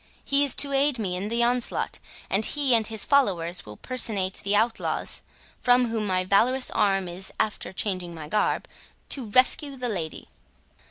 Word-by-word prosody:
He 280 +1 +3
is 280 - +4
to 280 -1 +1
aid 275 0 +2
me 190 -5 -2
in 190 +3 -3
the 235 +1 +2
onslaught, 245 0 0 0.3
and 200 +3 0
he 280 +1 +1
and 225 -2 +2
his 220 -2 +1
followers 180 - +1
will 105 0 -10
personate 205 -7 +1
the 200 +1 -1
outlaws, 225 +2 0 0.4
from 245 -1 +3
whom 220 -2 -2
my 185 -1 +1
valorous 240 +8 +2
arm 195 -2 +1
is, 180 +2 -5
after 215 - -2
changing 185 -3 -3
my 155 -2 -8
garb, 210 +7 0 0.4
to 260 -5 -4
rescue 260 +5 +2
the 250 -2 -4
lady." 170 -7 -5
220 Hz, 170 wpm, -25 LUFS, 185-250 Hz, 0.4 s, is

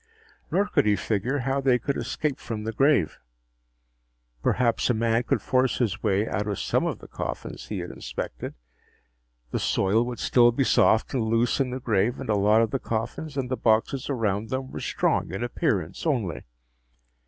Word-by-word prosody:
Nor 200 - +2
could 205 - +1
he 105 - +4
figure 115 +7 -1
how 135 +1 +1
they 130 -2 +4
could 140 +4 -2
escape 150 -4 -2
from 110 -2 -5
the 110 - -2
grave. 135 - +2 1.2
Perhaps 120 -1 +1
a 120 - +3
man 115 +1 +2
could 125 - -1
force 130 0 +2
his 115 -7 -1
way 105 0 +1
out 105 +2 -2
of 100 -2 -2
some - - 0
of - - -2
the - - -13
coffins - - -6
he - - -4
had - - -6
inspected. - - -6 1.0
The - - -1
soil 100 +4 +2
would 125 -1 -4
still 120 -1 +4
be 135 +4 +1
soft 110 -3 +3
and 125 -4 0
loose 115 +4 +1
in 135 -2 +1
the 130 +1 -4
grave 115 0 +1
and 135 -5 -2
a - - +3
lot 105 +3 +4
of 115 - -2
the 135 - -1
coffins 120 +7 -4
and 130 -1 -2
the - - +2
boxes 115 +5 +1
around 110 -5 -1
them 130 +1 -3
were - - -5
strong - - 0
in 95 +5 -3
appearance 115 - -1
only. 115 - -1
115 Hz, 190 wpm, -26 LUFS, 105-130 Hz, 1.2 s, he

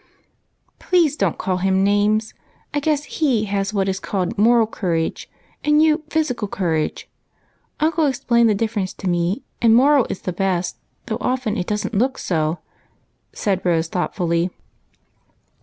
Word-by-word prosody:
" - - -45
Please 335 -6 +4
don't - - 0
call 185 -1 -1
him 190 +1 +2
names! 205 +2 +2 0.4
I 295 - +1
guess 295 0 0
he 260 -9 0
has 200 0 -1
what 195 -2 0
is 190 0 -1
called 190 -3 -2
moral 230 +2 +4
courage, 170 -7 -2 0.3
and 300 0 +4
you 310 0 +4
physical 260 -9 -1
courage. 165 -6 -2 0.7
Uncle 315 0 +2
explained 235 -3 +2
the 210 - +2
difference 210 -3 -2
to 195 - -6
me, 175 +7 0 0.2
and 225 -1 +5
moral 275 +1 +5
is - - -5
the 185 - -3
best, 185 -1 -1 0.3
though 220 - -3
often 250 -4 -1
it 180 -5 -3
doesn't 210 +2 -2
look 255 +6 +1
so," 160 -1 -1 0.7
said 195 -4 -1
Rose 165 -2 +1
thoughtfully. 175 -1 -1
210 Hz, 150 wpm, -21 LUFS, 185-250 Hz, 0.7 s, and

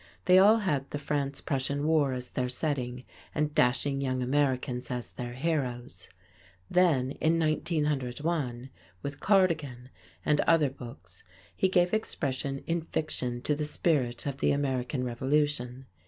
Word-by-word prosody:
They 185 0 +7
all 210 +4 +7
had 150 -11 -1
the - - -3
France 140 -1 -2
Prussian 140 +1 -1
War 155 -3 +3
as 125 -1 -5
their 125 -1 -2
setting, 125 -2 -3 0.3
and 150 0 0
dashing 135 +2 +2
young 130 -2 -1
Americans 130 -2 0
as 125 -1 -4
their 120 0 -6
heroes. 125 - -3 0.6
Then 155 -8 +3
in 165 +1 +3
1901 150 -4 -1 0.3
with 140 0 -5
"Cardigan" 160 - +1 0.4
and 150 -1 +3
other 155 -5 +3
books 95 -9 -11 0.3
he 190 - +2
gave 180 0 +3
expression 140 -9 -2
in 170 0 0
fiction 130 -6 -3
to 150 - +1
the 150 +1 -2
spirit 140 -6 0
of 140 -2 -3
the - - +2
American 130 -2 -1
Revolution. 130 0 -1
140 Hz, 140 wpm, -29 LUFS, 125-155 Hz, 0.6 s, They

